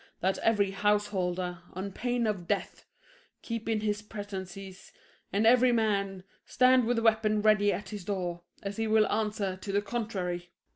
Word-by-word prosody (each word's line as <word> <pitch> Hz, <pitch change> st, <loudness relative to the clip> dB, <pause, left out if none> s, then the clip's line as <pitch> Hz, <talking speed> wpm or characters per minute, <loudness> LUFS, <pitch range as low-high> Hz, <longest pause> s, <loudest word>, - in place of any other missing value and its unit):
That 190 Hz, +2 st, +1 dB
every 205 Hz, -3 st, +2 dB
householder, 190 Hz, -4 st, 0 dB
on 190 Hz, +2 st, -4 dB
pain 245 Hz, +3 st, -1 dB
of 195 Hz, -5 st, -2 dB
death, -, -, -2 dB, 0.6 s
Keep 230 Hz, -1 st, -4 dB
in 220 Hz, -2 st, +1 dB
his 210 Hz, -1 st, -1 dB
prentices, 195 Hz, -2 st, -8 dB, 0.4 s
and 205 Hz, +3 st, +1 dB
every 250 Hz, +2 st, +6 dB
man 200 Hz, -5 st, 0 dB, 0.2 s
Stand 255 Hz, -1 st, +4 dB
with 240 Hz, +1 st, +1 dB
a 230 Hz, -, 0 dB
weapon 215 Hz, -2 st, +3 dB
ready 210 Hz, -1 st, +4 dB
at 205 Hz, -, -4 dB
his 210 Hz, -3 st, -6 dB
door, 180 Hz, -3 st, -3 dB, 0.2 s
As 200 Hz, +1 st, -4 dB
he 225 Hz, 0 st, 0 dB
will 215 Hz, 0 st, +4 dB
answer 210 Hz, -3 st, -1 dB
to 195 Hz, +1 st, -6 dB
the 200 Hz, +1 st, +1 dB
contrary. 190 Hz, -6 st, -3 dB
205 Hz, 160 wpm, -29 LUFS, 190-220 Hz, 0.6 s, every